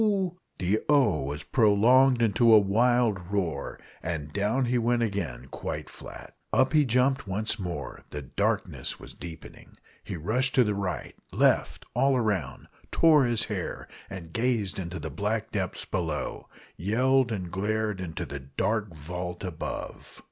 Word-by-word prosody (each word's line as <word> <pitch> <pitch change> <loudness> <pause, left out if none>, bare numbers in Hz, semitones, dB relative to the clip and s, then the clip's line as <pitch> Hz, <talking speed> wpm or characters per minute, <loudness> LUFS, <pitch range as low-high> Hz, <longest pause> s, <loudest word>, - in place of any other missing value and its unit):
The 95 +4 +1
"O!" 125 - +4
was 75 +1 -4
prolonged 120 +3 +4
into 115 +2 +4
a 110 - +10
wild 105 -2 +2
roar, 85 -9 -2 0.2
and 75 -3 -4
down 105 +6 +1
he 125 0 +1
went 120 0 +2
again 85 - -3
quite - - -5
flat. - - -10 0.2
Up 130 +3 +3
he 150 -2 +5
jumped 130 +1 +2
once 105 +3 -1
more; 85 -8 -5
the 75 -1 -6
darkness 65 - -2
was - - -10
deepening. 85 -2 -10 0.3
He - - -5
rushed 125 - +1
to 130 - +6
the 105 -2 0
right 100 -3 -3 0.2
left - - +2
all 130 +1 +3
round 105 -8 -1 0.2
tore 155 -4 +5
his 115 -1 +1
hair, 100 -5 -4 0.2
and 85 -4 -8
gazed 115 -5 0
into 85 -1 -5
the 80 0 -5
black 105 +7 -2
depths 95 -4 -2
below 80 -4 -3 0.3
yelled 125 +6 +2
and 90 -5 -4
glared 105 +1 -1
into 85 -3 -4
the 70 0 -6
dark 95 +8 -2
vault 90 +4 -5
above! 90 -4 -6
105 Hz, 150 wpm, -27 LUFS, 90-120 Hz, 0.3 s, a